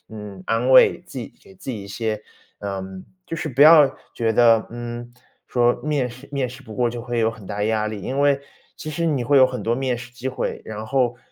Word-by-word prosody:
嗯， 105 -4 -9
安 115 +3 +1
慰， 130 - +7
自 - - -8
己 - - -7
给 95 - -17
自 95 - -7
己 110 -5 -5
一 - - -10
些， 110 +1 -3 0.4
嗯 95 -2 -6 0.2
就 165 - -4
是 160 - -3
不 135 +2 +3
要 155 -2 +8 0.2
觉 115 -1 0
得， 115 -1 +5
嗯， 120 0 -7 0.3
说 120 -1 +2
面 145 -4 0
试 125 +4 -13
面 135 -3 -1
试 130 +2 -11
不 110 -3 -10
过 120 -1 +1
就 120 0 -6
会 120 0 -3
有 110 0 +2
很 110 -3 -12
大 105 +1 -3
压 110 0 0
力。 110 -1 -5
因 135 +7 -3
为 140 -1 +3 0.4
其 155 - -6
实 165 +2 -1
你 145 -6 +1
会 140 +3 +3
有 130 - +8
很 130 -1 -5
多 115 +1 +1
面 130 -2 -1
试 125 0 -10
机 130 +1 -5
会， 130 - -3
然 110 0 -6
后， 125 -1 +1
120 Hz, 250 characters per minute, -22 LUFS, 110-130 Hz, 0.4 s, 要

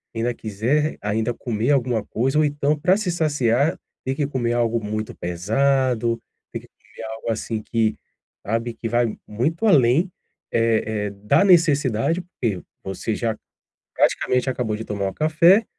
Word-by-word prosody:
ainda 115 +2 0
quiser 120 +9 0
r - - -24
ainda 110 +3 -1
comer 115 +1 -2
alguma 125 -6 +1
coisa, 135 +5 0
ou 155 - +4
então, 145 +1 0
para 185 +5 +3
se 195 -5 -1
saciar, 145 -4 +1 0.3
tem 130 - -1
que 145 - 0
comer 120 -4 -1
algo 115 -1 0
muito 110 +1 -4
pesado, 115 +6 +1 0.3
tem - - -5
que - - -16
comer - - -14
algo, 115 +1 -6
assim, 110 0 -3
que, 110 -1 0 0.5
sabe, 115 +3 -1
que 115 - -4
vai 120 -1 +1
muito 150 - -1
além, 150 - +4 0.4
eh 115 -1 +2 0.2
eh, - - -3
da 105 - +2
necessidade, 150 - +3
porque 120 - -3 0.2
você 95 +3 -3
já 115 -1 -1 0.6
praticamente 125 +1 +2
acabou 120 -4 -2
de 110 - -6
tomar 100 -2 -2
um 95 - -7
café. 170 +7 +4
120 Hz, 160 wpm, -22 LUFS, 110-145 Hz, 0.6 s, ou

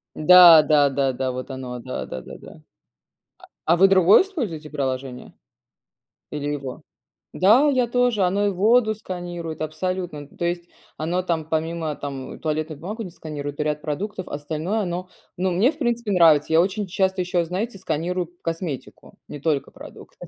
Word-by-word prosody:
Да, 170 0 +9
да, 145 -1 +3
да, 135 -1 0
да, 130 0 -2
вот 130 +2 -6
оно, 125 -2 -6
да-да-да, 115 - -7
да. - - -13 1.1
А 160 - +4
а 170 - +2
вы 195 +2 +7
другое 190 - +6
используете 210 - -5
приложение? 130 -3 -4 1.0
Или 145 -1 -4
его? 135 -3 -6 0.5
Да, 235 +11 +5
я 255 -3 +2
тоже, 245 -3 +1
оно 200 +3 +1
и - - +2
воду 215 +3 +3
сканирует, 175 -5 -6
абсолютно, 180 +1 -3
м, 145 -1 -9
то 170 - -2
есть 175 0 -2 0.3
оно 170 +4 -1
там 165 -4 -2
помимо 160 -1 -2
там 135 -2 -7
туалетную 155 -1 -3
бумагу 215 +6 -5
не 180 - -8
сканирует 145 -3 -7
и - - +1
ряд 150 0 -2
продуктов, 185 +5 -4
а - - -9
остальное 155 +8 -3
оно, 180 0 -4 0.3
ну, 185 0 0
мне 215 - +3
в 310 - -16
принципе 235 -5 -1
нравится. 160 -4 +4
Я 165 - +6
очень 195 +2 -2
часто 190 0 0
еще, 175 -1 0
знаете, 195 +5 -4
сканирую 175 0 -3
косметику, 165 -4 -6
не 145 - -8
только 150 -2 -1
продукты. - - -13
170 Hz, 165 wpm, -23 LUFS, 150-190 Hz, 1.1 s, Да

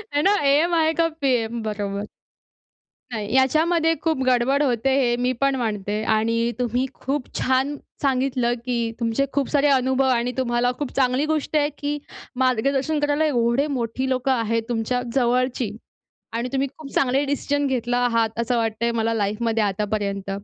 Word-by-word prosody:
हे 290 - +3
ना? 390 - +4
एएम 305 +5 +3
आहे 320 -1 +3
का 330 0 +2
पीएम? 245 -7 -1
बरोबर. 205 -1 -3 1.0
काय, 215 -3 -3
याच्यामध्ये 320 +5 +3
खूप 320 -5 0
गडबड 255 +3 +2
होते 255 -1 +1
हे 240 -2 +2
मी 250 +1 +2
पण 275 -1 +3
मानते 210 -3 -2
आणि 230 +2 +1
तुम्ही 245 +2 0
खूप 270 0 -3
छान 260 +3 +1 0.3
सांगितलं 255 -3 +1
की 235 -2 -1
तुमचे 230 +4 +1
खूप 280 -2 0
सारे 290 -1 +3
अनुभव 265 0 +2
आणि 245 0 +1
तुम्हाला 245 -1 +1
खूप 290 - -3
चांगली 260 +1 +2
गोष्ट 310 0 -2
आहे 295 0 +2
की 290 +1 -2 0.5
मार्गदर्शन 275 +5 +1
करायला 290 +1 +1
एवढे 250 0 +1
मोठी 260 -1 -2
लोकं 260 +1 0
आहेत 230 -2 0
तुमच्या 240 +2 -1
जवळची. 250 -3 +1 0.6
आणि 235 +2 -2
तुम्ही 275 0 0
खूप 295 -3 -9
चांगले 270 +2 +2
डिसिजन 285 0 -1
घेतला 245 -2 0
आहात 230 -2 +1
असं 235 +1 0
वाटतंय 225 +1 0
मला 230 0 0
लाईफमध्ये 220 +2 0
आतापर्यंत. 200 -1 -2
250 Hz, 155 wpm, -23 LUFS, 230-275 Hz, 1.0 s, ना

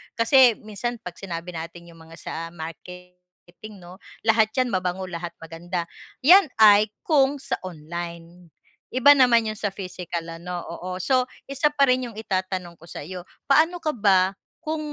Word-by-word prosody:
Kasi 235 +1 +5
minsan 225 +3 -5
'pag 180 -1 -8
sinabi 175 -2 -6
natin 170 +1 -8
yung 165 -1 -15
mga 165 0 -14
sa - - -7 0.2
marketing, 180 +4 -12
'no? 175 0 -12 0.3
Lahat 220 -1 +4
yan 255 - +2
mabango, 185 -3 -2
lahat 170 -1 -6
maganda, 170 +2 -5 0.3
yan 350 +2 +6
ay 210 -1 +7 0.2
kung 285 -2 +3
sa - - -3
online. 170 0 -8 0.4
Iba 285 +3 +6
naman 240 -4 +4
yung 215 - -3
sa 205 - -2
physical 180 -3 -6
ano, 175 +1 -6
oo. 180 +2 -6
So, 255 +6 +1 0.2
isa 275 +2 +1
pa 280 -2 +3
rin 250 -1 +1
yung - - -17
itatanong 185 -4 -3
ko 165 - -21
sa'yo, 180 +4 -7 0.2
paano 320 +5 +3
ka 310 -2 -2
ba 195 -3 +3 0.3
kung 315 0 -2
185 Hz, 155 wpm, -24 LUFS, 175-240 Hz, 0.4 s, ay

